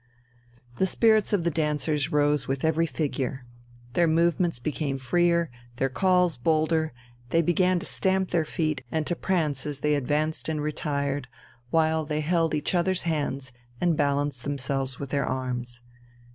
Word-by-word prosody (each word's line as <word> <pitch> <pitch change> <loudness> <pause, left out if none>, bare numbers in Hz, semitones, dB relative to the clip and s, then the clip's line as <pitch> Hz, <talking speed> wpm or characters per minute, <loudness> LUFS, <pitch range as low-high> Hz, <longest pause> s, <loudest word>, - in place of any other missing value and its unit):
The 190 - +2
spirits 220 +1 +3
of 200 -5 +2
the 170 - +1
dancers 150 0 0
rose 145 -2 +2
with 135 +2 -1
every 160 +1 +2
figure. 135 -4 -3 0.5
Their 170 +2 +3
movements 170 0 +2
became 135 +2 -2
freer, 170 +4 +2 0.2
their 135 +2 0
calls 180 +1 +2
bolder, 160 +3 +1 0.4
they 165 +4 +3
began 180 +2 +3
to 170 - -4
stamp 190 -1 +1
their 165 - +2
feet 155 -2 -2
and 160 -1 0
to 175 - -1
prance 155 -8 0
as 145 -2 -5
they 150 0 +2
advanced 150 +3 0
and 155 -1 -1
retired, 145 -2 -2 0.4
while 160 0 +2
they 150 0 -2
held 165 0 +1
each 150 - -1
other's 185 +1 +1
hands 145 -5 -2 0.3
and 175 -2 +2
balanced 145 -3 0
themselves 135 -2 -2
with 140 -2 -6
their 140 -2 0
arms. 125 -2 -3
155 Hz, 155 wpm, -26 LUFS, 140-170 Hz, 0.5 s, spirits